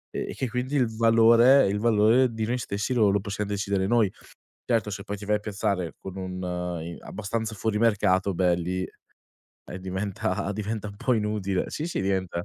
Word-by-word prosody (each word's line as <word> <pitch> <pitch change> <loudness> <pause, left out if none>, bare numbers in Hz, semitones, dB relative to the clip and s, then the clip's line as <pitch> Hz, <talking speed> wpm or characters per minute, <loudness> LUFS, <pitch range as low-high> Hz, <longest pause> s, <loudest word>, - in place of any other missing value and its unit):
e - - -3
che 130 - -3
quindi 125 +4 -2
il 115 -4 +1
valore 115 +3 +6
il 100 +1 0
valore 115 +3 +4
di 110 -1 -2
noi 125 +3 -1
stessi 100 +1 -2
lo 110 -4 +4
lo 100 +1 +2
possiam 100 +1 -4
decidere 100 -1 -1
noi." 115 -4 +3 0.6
Certo 115 -3 +1
se 100 0 -6
poi 105 - -4
ti 105 - -9
vai 105 0 +2
a - - -2
piazzare 100 -4 -2
con 95 0 -8
un 95 -1 -5
uhm, 90 -2 -4
abbastanza 110 +2 -4
fuori 105 +1 -1
mercato, 100 -4 +2
beh, 90 -1 +3
lì, 90 +2 -2 0.7
eh 90 - -11
diventa 95 +1 -3
diventa 105 +1 -4
un 100 - -10
po' 125 - 0
inutile. 105 -3 -1
Sì, 155 - -3
sì, 175 - -2
diventa 95 -3 -1
105 Hz, 190 wpm, -26 LUFS, 95-115 Hz, 0.7 s, valore